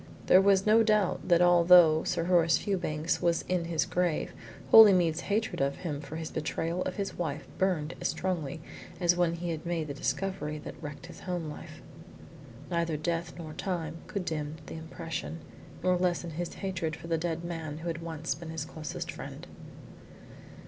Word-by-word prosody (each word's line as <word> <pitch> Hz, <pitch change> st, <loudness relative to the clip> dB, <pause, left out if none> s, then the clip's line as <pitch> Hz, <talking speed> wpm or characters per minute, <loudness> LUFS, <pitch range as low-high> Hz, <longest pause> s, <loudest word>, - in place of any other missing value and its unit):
There 185 Hz, -, +7 dB
was 195 Hz, -1 st, +4 dB
no 220 Hz, +2 st, +6 dB
doubt 215 Hz, -4 st, +2 dB
that 175 Hz, -1 st, +5 dB
although 175 Hz, -2 st, +7 dB
Sir 170 Hz, -2 st, 0 dB
Horace 170 Hz, -2 st, +4 dB
Fewbanks 165 Hz, -5 st, -1 dB
was 170 Hz, -1 st, +2 dB
in 180 Hz, -2 st, -1 dB
his 160 Hz, -4 st, 0 dB
grave, 175 Hz, -3 st, -1 dB, 0.4 s
Holymead's 180 Hz, -7 st, +8 dB
hatred 210 Hz, -6 st, 0 dB
of 140 Hz, 0 st, +1 dB
him 150 Hz, -5 st, -4 dB
for 155 Hz, -, -8 dB
his 160 Hz, -1 st, -5 dB
betrayal 165 Hz, +2 st, -2 dB
of 185 Hz, -, -3 dB
his 195 Hz, -2 st, -4 dB
wife 155 Hz, -3 st, -3 dB
burned 175 Hz, -5 st, +1 dB
as -, -, +1 dB
strongly 160 Hz, -5 st, -2 dB, 0.4 s
as 175 Hz, -1 st, +3 dB
when 175 Hz, -1 st, +1 dB
he 170 Hz, 0 st, -3 dB
had 160 Hz, -1 st, -4 dB
made 170 Hz, -2 st, -2 dB
the -, -, -3 dB
discovery 150 Hz, +2 st, -2 dB
that 150 Hz, -, -9 dB
wrecked 150 Hz, +2 st, -7 dB
his 175 Hz, -, -11 dB
home 175 Hz, -4 st, -4 dB
life. -, -, -10 dB, 0.9 s
Neither 170 Hz, -2 st, 0 dB
death 165 Hz, +2 st, -2 dB
nor 160 Hz, -3 st, -7 dB
time 165 Hz, -4 st, -3 dB
could 200 Hz, -3 st, -3 dB
dim 150 Hz, -2 st, -3 dB
the -, -, -8 dB
impression, 165 Hz, 0 st, -5 dB, 0.5 s
nor 185 Hz, 0 st, +3 dB
lessen 175 Hz, -1 st, 0 dB
his 170 Hz, +2 st, -4 dB
hatred 170 Hz, -5 st, -3 dB
for -, -, -12 dB
the 165 Hz, -1 st, 0 dB
dead 165 Hz, 0 st, -2 dB
man 160 Hz, -3 st, -5 dB
who 165 Hz, +2 st, -7 dB
had 165 Hz, 0 st, -3 dB
once 165 Hz, -1 st, -3 dB
been 165 Hz, +2 st, -9 dB
his 160 Hz, -1 st, -4 dB
closest 155 Hz, -1 st, -6 dB
friend. -, -, -8 dB
170 Hz, 175 wpm, -29 LUFS, 160-180 Hz, 0.9 s, Holymead's